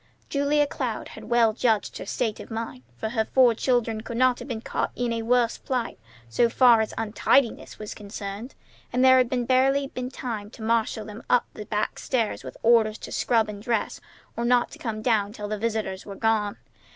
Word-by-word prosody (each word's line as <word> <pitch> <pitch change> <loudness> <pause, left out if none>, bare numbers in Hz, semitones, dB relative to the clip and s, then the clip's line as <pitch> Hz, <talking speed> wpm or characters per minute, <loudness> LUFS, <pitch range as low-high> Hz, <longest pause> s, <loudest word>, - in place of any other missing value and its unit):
Julia 290 +1 +2
Cloud 250 -5 -4
had 220 - -10
well 230 -1 +3
judged 225 -2 0
her - - -7
state 220 -3 -2
of - - -9
mind, 225 - -5 0.2
for 220 - -3
her 220 -1 +1
four 250 +1 +4
children 230 -2 0
could 230 +1 -6
not 255 0 +3
have - - -8
been 235 -4 -3
caught - - -2
in 245 -1 -1
a 230 - -2
worse 235 0 +2
plight 250 - -3 0.3
so 235 - +2
far 235 -2 +6
as 220 - -2
untidiness 225 +3 +1
was 215 -1 -6
concerned, 205 +3 -7 0.4
and 250 +1 +3
there 260 0 +7
had 245 -1 0
barely 270 +2 +3
been 250 -1 -5
time 225 -6 -5
to 220 - -11
marshal 220 -1 0
them 210 +1 -9
all - - +6
up - - -8
the 210 - -8
back 210 -1 -2
stairs 230 -5 -1
with - - -9
orders 225 -2 +4
to - - -9
scrub 225 -2 +2
and 205 -1 -7
dress 230 -1 -1 0.3
or 235 - -2
not 245 0 +3
to - - -11
come 215 -3 -4
down 215 -4 +1
till 210 -3 -6
the 210 0 -3
visitors 215 -4 -2
were 200 - -8
gone. 215 -2 0
230 Hz, 205 wpm, -25 LUFS, 215-245 Hz, 0.4 s, there